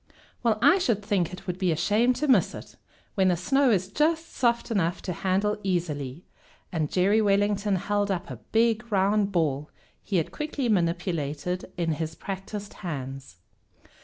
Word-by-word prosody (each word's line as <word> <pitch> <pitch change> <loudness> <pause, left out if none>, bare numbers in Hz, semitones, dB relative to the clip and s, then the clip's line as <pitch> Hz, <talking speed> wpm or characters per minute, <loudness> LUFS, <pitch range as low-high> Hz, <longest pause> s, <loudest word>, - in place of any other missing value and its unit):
"Well, 230 -3 +2
I 305 +8 +6
should 220 - 0
think 195 -6 +1
it'd 185 0 -6
be 185 -3 +2
a - - +1
shame 225 +9 +3
to 300 +4 -2
miss 260 - +4
it, - - -10 0.4
when 190 -1 +2
the 180 -2 +3
snow 270 +10 +3
is 190 -5 +2
just 320 - 0
soft 235 -1 +1
enough 175 -5 +1
to 180 - -3
handle 195 +4 0
easily," 165 -6 -2 0.5
and 155 -4 -1
Jerry 200 +4 +3
Wellington 205 0 +2
held 205 +2 0
up 190 +1 -2
a - - -6
big 225 0 0
round 200 +1 +2
ball 150 -5 0 0.3
he 195 - -1
had 165 - -1
quickly 300 -4 -3
manipulated 170 -3 -1
in 170 -2 0
his 160 +1 -3
practiced 195 +3 -6
hands. 135 - -6
195 Hz, 165 wpm, -26 LUFS, 170-215 Hz, 0.5 s, I